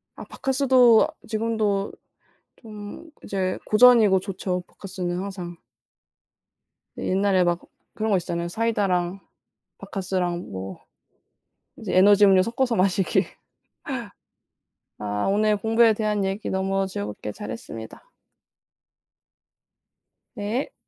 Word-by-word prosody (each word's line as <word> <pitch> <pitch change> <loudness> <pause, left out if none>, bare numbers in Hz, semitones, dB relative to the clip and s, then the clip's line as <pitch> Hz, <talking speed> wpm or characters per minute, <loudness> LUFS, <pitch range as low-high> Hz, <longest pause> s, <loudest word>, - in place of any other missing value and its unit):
아 - - -9
박카스도 260 -1 +4 0.2
지금도 215 -3 -1 0.7
좀 215 +8 -10
이제 185 -2 -2
고전이고 215 -4 +6
좋죠 185 -1 -3
박카스는 180 -2 -5
항상. 180 -3 -6 1.4
옛날에 190 -1 +2
막 175 0 +1 0.3
그런 220 0 -2
거 195 - +4
있었잖아요. 170 0 -3
사이다랑 195 -4 0 0.6
박카스랑 180 -2 -3
뭐 95 0 -7 1.0
이제 - - -4
에너지 205 +2 +7
음료 190 -2 +6
섞어서 240 +2 0
마시기. 185 -1 +2 1.7
아. 105 0 -2
오늘 210 +1 +2
공부에 225 +1 +4
대한 210 -2 -1
얘기 195 +2 -3
너무 195 0 0
즐겁게 105 - -5
잘했습니다. 110 - -9 2.2
네. 215 +6 -3
195 Hz, 225 characters per minute, -24 LUFS, 180-220 Hz, 2.2 s, 에너지